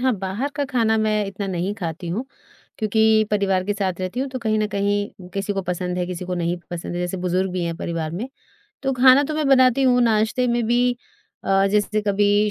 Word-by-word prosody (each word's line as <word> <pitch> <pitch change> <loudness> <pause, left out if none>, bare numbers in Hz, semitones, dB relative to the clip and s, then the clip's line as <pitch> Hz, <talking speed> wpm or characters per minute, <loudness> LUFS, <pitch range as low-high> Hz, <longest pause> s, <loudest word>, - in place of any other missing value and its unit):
हाँ, 255 0 +2
बाहर 195 +9 -2
का 285 - 0
ख़ाना 230 -5 +1
मैं 215 -1 +1
इतना 195 0 -5
नहीं 190 +2 -2
खाती 170 -3 -5
हूँ 220 +10 -2 0.5
क्योंकि 220 0 +3
परिवार 195 -3 +1
के 205 - 0
साथ 190 -3 -2
रहती 185 +7 -3
हूँ 275 - -2
तो 260 - -4
कहीं 215 -2 0
न 215 - +1
कहीं 205 -1 -2
किसी 200 +1 -1
को 195 -1 -2
पसंद 180 0 -3
है, 180 - -1
किसी 180 0 -5
को 180 0 -3
नहीं 175 0 -1
पसंद 175 0 -5
है। 175 - -2
जैसे 180 +1 -2
बुज़ुर्ग 185 +1 0
भी 180 -2 -2
हैं 165 -1 -3
परिवार 165 -3 -3
में। 210 +10 -4 0.5
तो 270 0 0
ख़ाना 260 +2 +6
तो 310 - -3
मैं 305 -2 0
बनाती 260 0 +5
हूँ। 250 -1 +4
नाश्ते 225 +3 +2
में 240 0 +1
भी 245 +1 +2 0.5
अ, 195 0 +3
जैसे 210 +1 +1
कभी 205 +1 +2
205 Hz, 220 wpm, -22 LUFS, 185-235 Hz, 0.5 s, ख़ाना